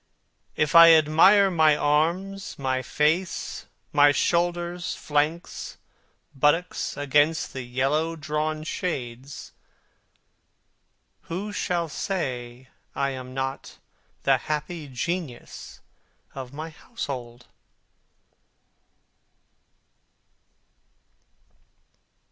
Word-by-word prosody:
If 150 -1 0
I 165 0 +10
admire 165 +6 +5
my 155 -3 +4
arms, 170 +7 0
my 130 -1 -1
face, 155 +7 -1 0.3
my 145 0 +6
shoulders, 175 +4 0
flanks, 150 +3 -2 0.6
buttocks 150 +5 0
against 145 +3 +1
the 130 - -4
yellow 135 +7 0
drawn 155 0 -2
shades, 135 -6 -5 1.8
Who 200 +5 -4
shall 175 -4 -1
say 130 -8 -4 0.3
I 140 0 0
am 130 -1 -8
not 135 0 -4 0.5
the - - +4
happy 150 +1 -4
genius 140 0 -5 0.5
of 130 -2 -7
my 155 +3 -7
household? 125 - -7
150 Hz, 75 wpm, -25 LUFS, 135-170 Hz, 1.8 s, I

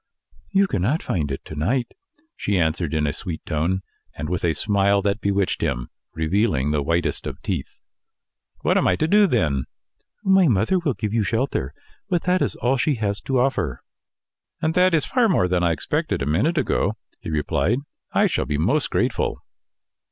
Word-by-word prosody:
"You 200 0 +3
cannot 130 - 0
find 75 -6 -1
it 70 - -5
to - - -8
night," 115 - -1 0.4
she 100 - -1
answered, 80 -1 0
in 75 -1 +1
a 70 - 0
sweet 80 +1 -6
tone, 85 +5 -1 0.3
and 75 +1 -5
with 90 -1 -2
a 85 -2 +2
smile 100 +2 +2
that 100 +2 0
bewitched 100 -1 0
him, 65 -6 -2 0.2
revealing 80 - +1
the 75 -1 +1
whitest 85 +3 -1
of - - -6
teeth. - - -4 0.8
"What - - +3
am - - +2
I 90 - +3
to 130 - 0
do, 205 +3 +5
then?" 75 - +1 0.6
"My 190 -3 +5
mother 115 - +2
will 150 -8 -1
give 105 -1 -3
you 115 - +2
shelter, 110 - -1 0.4
but 175 -2 +1
that 180 0 +2
is - - 0
all 130 +2 +1
she 145 +3 +1
has 105 -3 -2
to 135 - -1
offer." 90 - 0 0.8
"And 160 -1 0
that 180 -1 +4
is 155 - +2
far 245 -3 +2
more 95 - +3
than 90 -1 +1
I 85 -1 +3
expected 75 -2 -1
a - - -1
minute 105 - +1
ago," 105 -7 +1 0.2
he - - -7
replied. 80 - +1 0.3
"I - - +3
shall - - 0
be 75 - -1
most 120 - +1
grateful." - - -1
100 Hz, 185 wpm, -23 LUFS, -, 0.8 s, do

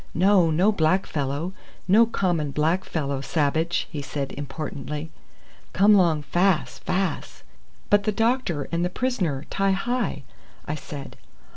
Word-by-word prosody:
"No, 185 0 +4
no 180 +7 +3
black 185 0 +2
fellow 145 +5 -3 0.3
no 220 +5 +6
common 175 -9 0
black 160 +6 +1
fellow 140 -4 -2
sabbage," 160 +4 0
he 150 -3 -4
said 140 -1 -4
importantly. 145 +1 -5 0.6
"Come 205 +3 +5
long 170 -6 +3
fas, 175 +1 +1
fas." 185 -3 -2 0.5
"But 205 -1 +4
the 215 - +2
doctor 225 - 0
and 170 0 0
the 180 - 0
prisoner 185 - -1
and - - -16
Ti 195 0 +2
hi?" 205 - -2 0.4
I 150 - -2
said. 145 -2 -8
170 Hz, 140 wpm, -24 LUFS, 150-195 Hz, 0.6 s, no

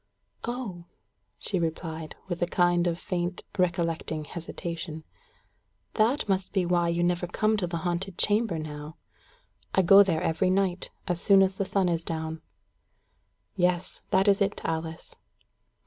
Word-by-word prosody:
"Oh!" 230 -8 -5 0.5
she 190 - 0
replied, 160 -1 -4
with 175 -2 -4
a 175 - +2
kind 175 0 +2
of 170 -1 0
faint 180 -1 -3
recollecting 170 -4 0
hesitation. 165 -1 -6 0.9
"That 235 +6 +2
must 190 -1 0
be 190 -3 +2
why 175 -1 +2
you 170 +1 +1
never 175 0 +1
come 215 +5 +1
to 185 -4 -1
the 170 0 -3
haunted 175 +1 -2
chamber 210 -4 +2
now. 150 0 -7 0.8
I 190 - +5
go 195 +3 +9
there 175 -5 +2
every 175 +3 +1
night, 185 -1 0 0.2
as 175 -2 +1
soon 195 -2 +6
as 190 0 +1
the 195 +1 -2
sun 190 -1 +1
is 170 -1 0
down." 160 -1 -4 1.1
"Yes, 180 -2 0
that 190 +2 +3
is 200 0 +4
it, 200 +1 +1
Alice." 160 0 -4
175 Hz, 145 wpm, -27 LUFS, 165-195 Hz, 1.1 s, go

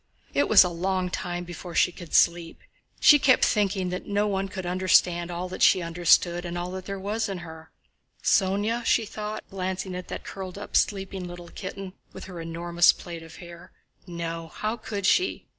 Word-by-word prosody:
It 285 - +1
was 210 - +9
a 180 - -1
long 180 +1 -2
time 175 0 -3
before 175 0 -9
she 180 - +4
could 175 -2 -7
sleep. 170 -1 +2 0.4
She 295 -2 +7
kept 260 -2 +4
thinking 195 -3 0
that 180 0 -5
no 205 +1 +1
one 195 -1 -1
could 190 -2 -6
understand 180 -1 +2
all 175 +1 -4
that 185 - -7
she 185 - +5
understood 175 +1 +2
and 175 0 -5
all 175 +1 -4
there 190 +1 -5
was 210 +3 -2
in 195 - -3
her. 160 0 -11 0.5
"Sónya?" 205 +4 +1
she 230 - +2
thought, 215 0 -6
glancing 190 0 -3
at 180 0 -6
that - - -6
curled 190 -1 -7
up, 205 - -8
sleeping 195 -2 0
little 175 -1 -9
kitten 195 -1 -7 0.2
with - - -9
her 180 -3 -8
enormous 170 +1 +3
plait 170 -2 -9
of 165 -1 -12
hair. 170 -1 -12 0.3
"No, 165 -1 -5
how 215 +7 -3
could 205 -3 -5
she? 365 - +2
185 Hz, 185 wpm, -26 LUFS, 175-195 Hz, 0.5 s, was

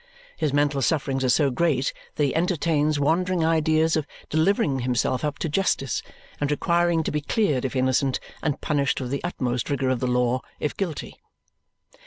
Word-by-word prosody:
His 155 -3 -1
mental 145 0 +1
sufferings 135 -1 0
are 130 - +2
so 140 +2 +3
great 140 -2 +1 0.2
that 150 - +1
he 140 - +1
entertains 160 -3 +1
wandering 170 +3 +1
ideas 160 0 +2
of 155 -2 -1 0.2
delivering 160 - +2
himself 125 +1 0
up 150 -1 -1
to - - -2
justice 145 - 0 0.4
and 145 - 0
requiring 170 +2 +2
to - - -2
be 150 - -1
cleared 145 - 0
if 130 - -3
innocent 130 +1 +1 0.2
and 150 -3 -1
punished 145 -2 0
with 125 -2 -4
the 140 - -2
utmost 125 -8 -2
rigour 135 -2 0
of 130 -2 +1
the 125 - -1
law 125 0 +1 0.2
if 150 - -2
guilty. 175 -7 -4
145 Hz, 175 wpm, -24 LUFS, 130-160 Hz, 0.4 s, so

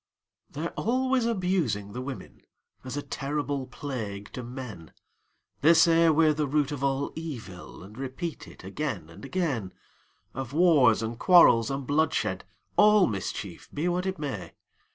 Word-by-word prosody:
They're 155 +4 -4
always 255 +2 0
abusing 180 - -1
the 125 - -4
women, 130 0 -8 0.4
As 130 +2 -5
a 145 - -3
terrible 145 -1 -3
plague 110 -8 -6
to 125 - -5
men; 120 - -8 0.7
They 160 +5 +6
say 165 0 +5
we're 155 0 +4
the 150 -1 -1
root 145 0 +1
of 140 -2 -4
all 140 0 0
evil, 120 - -8
And 100 +3 -13
repeat 135 +6 -5
it - - -14
again 80 - -4
and 85 - -13
again 135 - -2 0.6
Of 135 -1 -6
war, 155 -7 +5
and 115 +1 -4
quarrels, 125 - +6
and 135 0 -3
bloodshed, 140 -10 0 0.3
All 210 -2 +6
mischief, 100 -5 -5
be 155 +4 -2
what 180 +1 0
it 190 - -2
may. 145 -3 -5
140 Hz, 150 wpm, -27 LUFS, 120-165 Hz, 0.7 s, They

